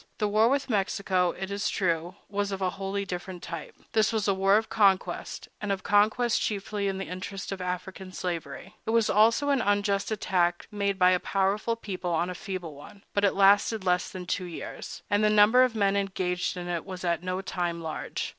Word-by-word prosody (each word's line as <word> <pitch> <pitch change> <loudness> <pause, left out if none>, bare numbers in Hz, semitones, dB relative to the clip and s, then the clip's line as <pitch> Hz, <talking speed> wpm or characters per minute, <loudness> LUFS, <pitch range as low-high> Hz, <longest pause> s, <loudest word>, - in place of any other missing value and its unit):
The 210 - +1
war 215 +3 +4
with 280 +1 0
Mexico, 195 -4 +1
it 190 +1 -5
is 200 0 -1
true, 175 -1 -1
was 205 0 -2
of 195 - -3
a 185 -1 0
wholly 195 +1 -3
different 180 -1 -6
type. 165 -3 -7 0.2
That 220 -1 +3
was 220 -2 0
a 200 - +4
war 195 +1 +4
of 220 0 -1
conquest, 200 -4 +1
and 210 -1 -2
of 190 -1 -2
conquest 215 +3 +3
chiefly 205 -1 -2
in 195 -1 -1
the 195 - -4
interest 195 +2 -6
of 195 -1 -4
African 185 +1 -5
slavery. 175 +1 -5
It - - -1
was 230 -1 +3
also 230 +7 +4
an 275 -3 +3
unjust 205 -1 +1
attack 180 -5 0
made 200 -2 -1
by 180 -1 +5
a 180 - +3
powerful 200 +5 0
people 190 -5 -5
on 170 +2 0
a - - -4
feeble 180 -4 -6
one; 150 +8 -13
but 200 - +1
it 200 - +3
lasted 200 +2 +4
less 180 -1 +1
than 185 -2 -7
two 180 +1 -2
years, 175 -2 -7
and 205 +1 +2
the 210 - +5
number 215 +4 +6
of 255 -3 +3
men 200 -2 +2
engaged 185 -2 -1
in 175 0 -5
it 175 -2 -2
was 185 -1 -8
at 170 -2 0
no 185 +1 -2
time 175 -3 -2
large. 160 -1 -4
195 Hz, 210 wpm, -27 LUFS, 180-205 Hz, 0.2 s, number